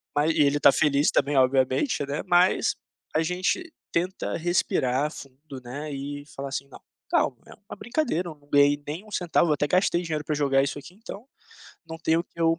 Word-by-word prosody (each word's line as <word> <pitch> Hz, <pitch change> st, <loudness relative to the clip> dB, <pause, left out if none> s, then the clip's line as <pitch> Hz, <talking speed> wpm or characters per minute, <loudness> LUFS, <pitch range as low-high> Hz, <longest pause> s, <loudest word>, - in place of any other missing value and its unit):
mas 150 Hz, +2 st, +3 dB
e -, -, +2 dB
ele 145 Hz, +1 st, +2 dB
tá -, -, +8 dB
feliz 145 Hz, +1 st, +2 dB
também, 145 Hz, +1 st, +1 dB
obviamente, 130 Hz, -, +2 dB
né. 145 Hz, +1 st, -2 dB
Mas 180 Hz, 0 st, +3 dB, 0.4 s
a 155 Hz, -, +3 dB
gente 185 Hz, -, -1 dB, 0.2 s
tenta 180 Hz, +3 st, -2 dB
respirar 150 Hz, -5 st, 0 dB
fundo, 135 Hz, +1 st, -11 dB
né, 145 Hz, +5 st, -6 dB
e 145 Hz, +1 st, -5 dB
falar 140 Hz, 0 st, -5 dB
assim: 140 Hz, 0 st, -4 dB
"Não, -, -, -13 dB, 0.3 s
calma, -, -, +1 dB
é -, -, -13 dB
uma 205 Hz, -, -12 dB
brincadeira, 225 Hz, -, -1 dB
eu 160 Hz, -, -9 dB
não 145 Hz, -1 st, -27 dB
ganhei 145 Hz, 0 st, +4 dB
nem 165 Hz, +8 st, -5 dB
um 215 Hz, -, -16 dB
centavo, 175 Hz, -2 st, +1 dB
eu -, -, +4 dB
até 145 Hz, -, 0 dB
gastei 180 Hz, 0 st, +2 dB
dinheiro 155 Hz, -3 st, -3 dB
pra 155 Hz, -, -1 dB
jogar 135 Hz, -2 st, +2 dB
isso 140 Hz, -, -3 dB
aqui, 170 Hz, -, -13 dB
então, 215 Hz, +3 st, -10 dB, 0.6 s
não 160 Hz, 0 st, -8 dB
tem 160 Hz, 0 st, +1 dB
o 170 Hz, -, -2 dB
que 170 Hz, -, -14 dB
eu 165 Hz, 0 st, +3 dB
150 Hz, 205 wpm, -26 LUFS, 140-175 Hz, 0.6 s, tá